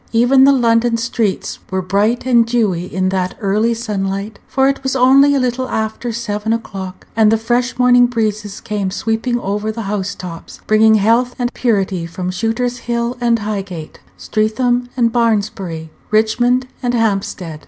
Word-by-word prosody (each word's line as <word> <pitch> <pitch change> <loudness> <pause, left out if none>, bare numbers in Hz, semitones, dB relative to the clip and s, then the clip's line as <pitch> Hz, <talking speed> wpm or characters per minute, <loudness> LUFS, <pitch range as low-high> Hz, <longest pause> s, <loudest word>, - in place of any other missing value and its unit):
Even 245 +4 +5
the 280 - +6
London 235 -2 +2
streets 230 -3 -2
were 190 0 -2
bright 205 +7 0
and 240 -2 +4
dewy 215 -7 0
in 185 0 0
that 185 -1 -2
early 215 +2 +1
sunlight, 200 -2 -4
for 265 0 +2
it 275 0 0
was 265 0 -2
only 270 +3 +5
a - - +2
little 255 0 -1
after 220 +2 -3
seven 220 -1 -2
o'clock, 195 -5 -6
and 220 -1 +4
the 225 - +3
fresh 240 +3 -1
morning 245 -1 +5
breezes 215 -4 -3
came 205 -3 -2
sweeping 225 +5 -1
over 210 +1 -2
the 225 +1 -5
house 200 -1 -3
tops, 170 -2 -9
bringing 220 0 +5
health 230 +4 +2
and 245 -1 -2
purity 195 -7 0
from 180 +2 -4
Shooter's 235 +5 -2
Hill 235 +1 -1
and 235 -1 +3
Highgate, 195 -7 -5 0.2
Streatham 245 +3 0
and 235 -2 +2
Barnsbury, 205 -8 -1 0.2
Richmond 240 +4 +2 0.2
and 245 -1 0
Hampstead. 195 -7 -2
225 Hz, 160 wpm, -17 LUFS, 200-245 Hz, 0.2 s, the